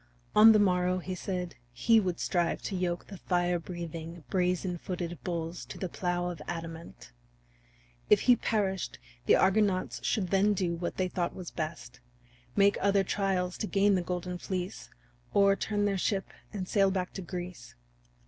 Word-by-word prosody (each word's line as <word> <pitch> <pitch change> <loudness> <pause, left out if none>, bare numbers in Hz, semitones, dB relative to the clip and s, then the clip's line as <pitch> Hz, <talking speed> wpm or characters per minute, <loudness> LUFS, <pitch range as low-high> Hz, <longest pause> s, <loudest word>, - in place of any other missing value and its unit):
On 215 +1 +10
the 215 - +6
morrow, 180 -2 +2
he 185 +1 -4
said, 180 -1 -4
he 220 - +4
would 185 -4 -2
strive 175 -2 0
to 200 - -3
yoke 175 -1 -1
the 195 -3 -10
fire 175 -1 +1
breathing, 165 -1 -7
brazen 180 -1 0
footed 175 -1 -4
bulls 170 -1 -3
to - - -9
the 185 - -3
plow 175 0 -1
of 165 -4 -9
adamant. 165 - -7 1.0
If 210 - +6
he 245 - +6
perished 200 -5 -1 0.3
the - - +7
Argonauts 195 -1 +2
should 190 -5 0
then 200 +2 +4
do 180 -3 0
what 170 +1 -4
they 185 - +1
thought 175 -1 -2
was 180 -3 -7
best 155 -7 -5 0.6
make 200 0 +4
other 200 0 +3
trials 185 -2 -1
to 215 - -2
gain 200 0 +3
the 185 - +2
Golden 180 0 -4
Fleece, 185 0 -4 0.5
or 200 0 +5
turn 205 0 -1
their 200 -2 0
ship 195 +1 0 0.2
and 190 -3 -4
sail 195 -2 +3
back 185 -1 -2
to 195 - -5
Greece. 180 0 -7
180 Hz, 165 wpm, -30 LUFS, 175-195 Hz, 1.0 s, On